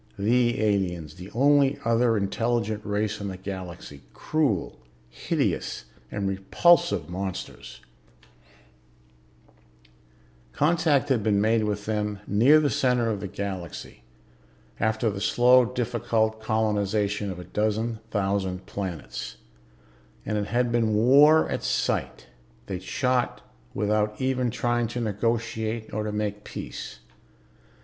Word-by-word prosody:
The 120 Hz, +3 st, +2 dB
aliens, 95 Hz, -7 st, 0 dB
the 90 Hz, +1 st, -10 dB
only 140 Hz, +3 st, +3 dB
other 115 Hz, 0 st, +3 dB
intelligent 110 Hz, +1 st, -1 dB
race 105 Hz, +1 st, -2 dB
in 100 Hz, -, -3 dB
the 95 Hz, -1 st, -5 dB
Galaxy... 90 Hz, -6 st, -8 dB
cruel, 145 Hz, -, -1 dB, 0.3 s
hideous -, -, -2 dB, 0.2 s
and 100 Hz, -1 st, -2 dB
repulsive 95 Hz, -, +3 dB
monsters. 90 Hz, -7 st, -6 dB, 2.7 s
Contact 150 Hz, -2 st, +2 dB
had 125 Hz, -5 st, +2 dB
been 105 Hz, -1 st, +2 dB
made 110 Hz, +1 st, +2 dB
with 105 Hz, -1 st, -3 dB
them 105 Hz, -1 st, -2 dB
near 125 Hz, +10 st, +5 dB
the 150 Hz, -2 st, +1 dB
center 125 Hz, -3 st, +1 dB
of 105 Hz, -, -3 dB
the 100 Hz, -, -5 dB
Galaxy, 95 Hz, -4 st, -6 dB, 0.8 s
after 110 Hz, 0 st, +1 dB
the 100 Hz, 0 st, -6 dB
slow, 125 Hz, +2 st, +5 dB
difficult 115 Hz, -2 st, -1 dB
colonization 105 Hz, -2 st, 0 dB
of 95 Hz, -, -5 dB
a 90 Hz, -, -7 dB
dozen 110 Hz, +4 st, -1 dB
thousand 95 Hz, -3 st, -1 dB
planets; 95 Hz, -6 st, -6 dB, 0.9 s
and 105 Hz, -, -2 dB
it 105 Hz, -1 st, -1 dB
had 120 Hz, +1 st, 0 dB
been 115 Hz, -2 st, +1 dB
war 140 Hz, +8 st, +6 dB
at -, -, -3 dB
sight; -, -, -1 dB, 0.4 s
they'd 95 Hz, -2 st, -5 dB
shot 125 Hz, +5 st, -1 dB, 0.3 s
without 105 Hz, +1 st, 0 dB
even 130 Hz, -1 st, 0 dB
trying 120 Hz, 0 st, 0 dB
to 120 Hz, +2 st, -5 dB
negotiate, 110 Hz, 0 st, -2 dB
or 105 Hz, +1 st, -1 dB
to 105 Hz, -, -3 dB
make 105 Hz, 0 st, -3 dB
peace. -, -, -8 dB
110 Hz, 120 wpm, -26 LUFS, 100-120 Hz, 2.7 s, war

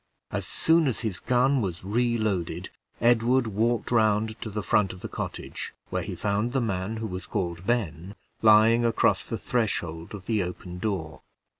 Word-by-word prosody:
As -, -, -2 dB
soon 165 Hz, -1 st, +3 dB
as 125 Hz, -, -1 dB
his 110 Hz, -7 st, -3 dB
gun 130 Hz, +2 st, +2 dB
was 90 Hz, -4 st, -3 dB
reloaded, 105 Hz, -5 st, -1 dB, 0.3 s
Edward 120 Hz, +2 st, +3 dB
walked 115 Hz, +3 st, 0 dB
round 110 Hz, -1 st, +2 dB
to 110 Hz, -, -4 dB
the 105 Hz, 0 st, -4 dB
front 100 Hz, -2 st, +2 dB
of 90 Hz, -, -12 dB
the -, -, -4 dB
cottage, -, -, -6 dB, 0.2 s
where -, -, 0 dB
he -, -, -5 dB
found 105 Hz, +4 st, -1 dB
the 135 Hz, -, +2 dB
man 105 Hz, -2 st, -2 dB
who 110 Hz, -, -3 dB
was 90 Hz, -2 st, -5 dB
called 90 Hz, -3 st, -3 dB
Ben, 95 Hz, -5 st, -1 dB, 0.3 s
lying 110 Hz, +2 st, +6 dB
across 115 Hz, -1 st, +2 dB
the -, -, -2 dB
threshold 90 Hz, -7 st, -2 dB
of 95 Hz, -, -10 dB
the 110 Hz, -3 st, +1 dB
open 90 Hz, 0 st, -6 dB
door. 90 Hz, -7 st, -3 dB
110 Hz, 170 wpm, -27 LUFS, 95-120 Hz, 0.3 s, lying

